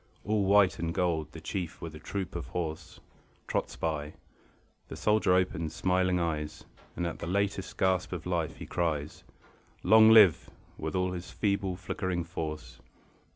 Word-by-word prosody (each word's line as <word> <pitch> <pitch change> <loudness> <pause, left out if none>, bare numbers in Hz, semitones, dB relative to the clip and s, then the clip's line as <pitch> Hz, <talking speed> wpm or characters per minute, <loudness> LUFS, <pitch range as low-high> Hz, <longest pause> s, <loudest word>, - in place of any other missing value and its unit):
All 105 0 +1
white 100 -1 +4
and 85 0 -1
gold 85 -4 0
the 80 - -9
Chief 85 +1 -4
with 80 -1 -7
a 75 - -9
troop 95 +3 -5
of - - -4
horse 80 -3 -5 0.5
Trots - - -2
by. 75 -2 -3 0.7
The - - -7
soldier 105 -3 +3
opens 85 -4 0
smiling 90 0 +1
eyes; 75 -3 -3 0.3
And 90 - -2
at 85 - -4
the - - -5
latest 100 +1 -1
gasp 95 -1 +1
of 90 -3 -5
life 85 -3 -1
he - - -8
cries: 75 -4 -2 0.6
"Long 110 +3 +7
live!" 105 -7 +7 0.3
with 80 +3 -4
all 90 0 +1
his 90 0 -6
feeble 100 -3 -1
flickering 90 -1 -3
force. 80 -2 -6
90 Hz, 155 wpm, -29 LUFS, 80-95 Hz, 0.7 s, Long